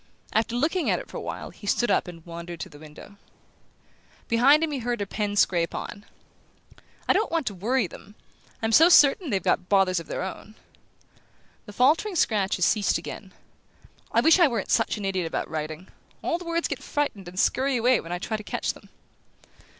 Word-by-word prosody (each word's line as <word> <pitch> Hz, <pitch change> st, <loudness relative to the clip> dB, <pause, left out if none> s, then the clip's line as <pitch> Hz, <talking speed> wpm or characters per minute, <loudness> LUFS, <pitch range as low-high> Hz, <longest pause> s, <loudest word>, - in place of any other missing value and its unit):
After 225 Hz, +2 st, 0 dB
looking 320 Hz, +7 st, 0 dB
at -, -, +2 dB
it -, -, -8 dB
for -, -, -6 dB
a -, -, -5 dB
while -, -, -6 dB
he 205 Hz, -, -12 dB
stood 240 Hz, +4 st, +1 dB
up -, -, +1 dB
and 165 Hz, -2 st, -11 dB
wandered 170 Hz, 0 st, -8 dB
to -, -, -6 dB
the 145 Hz, -, -15 dB
window. 155 Hz, +6 st, -13 dB, 1.1 s
Behind 270 Hz, +7 st, +5 dB
him 320 Hz, -, -1 dB
he 280 Hz, -, -2 dB
heard 240 Hz, 0 st, -2 dB
her 205 Hz, -, -1 dB
pen 205 Hz, +1 st, -3 dB
scrape 170 Hz, -4 st, +2 dB
on. 205 Hz, +1 st, -7 dB, 1.0 s
"I -, -, +5 dB
don't 425 Hz, +4 st, 0 dB
want 330 Hz, -4 st, 0 dB
to 210 Hz, -, -2 dB
worry 225 Hz, +6 st, 0 dB
them 195 Hz, +4 st, -12 dB, 0.5 s
I'm 225 Hz, -, +1 dB
so 325 Hz, +9 st, +7 dB
certain 295 Hz, 0 st, +5 dB
they've 195 Hz, -6 st, -1 dB
got 180 Hz, -1 st, 0 dB
bothers 190 Hz, -3 st, +3 dB
of 165 Hz, -, -10 dB
their -, -, -3 dB
own." 195 Hz, +3 st, -8 dB, 1.1 s
The 205 Hz, -, -10 dB
faltering 310 Hz, -, +2 dB
scratches 200 Hz, -, +1 dB
ceased 210 Hz, -3 st, +2 dB
again. -, -, -8 dB, 0.8 s
"I -, -, +3 dB
wish 325 Hz, +3 st, +5 dB
I 345 Hz, -, +7 dB
weren't 230 Hz, -7 st, -3 dB
such -, -, +2 dB
an 205 Hz, -, -5 dB
idiot 190 Hz, -3 st, -1 dB
about -, -, -3 dB
writing: 155 Hz, +3 st, -5 dB, 0.4 s
all 335 Hz, -, -1 dB
the 355 Hz, -, -10 dB
words 335 Hz, 0 st, -1 dB
get -, -, -5 dB
frightened 250 Hz, -11 st, -3 dB
and 180 Hz, +1 st, -6 dB
scurry 265 Hz, +3 st, +2 dB
away 245 Hz, +1 st, +3 dB
when 165 Hz, -, -9 dB
I 175 Hz, -, -1 dB
try 220 Hz, +4 st, -3 dB
to 215 Hz, -, -9 dB
catch -, -, -2 dB
them." -, -, -17 dB
210 Hz, 200 wpm, -25 LUFS, 185-275 Hz, 1.1 s, so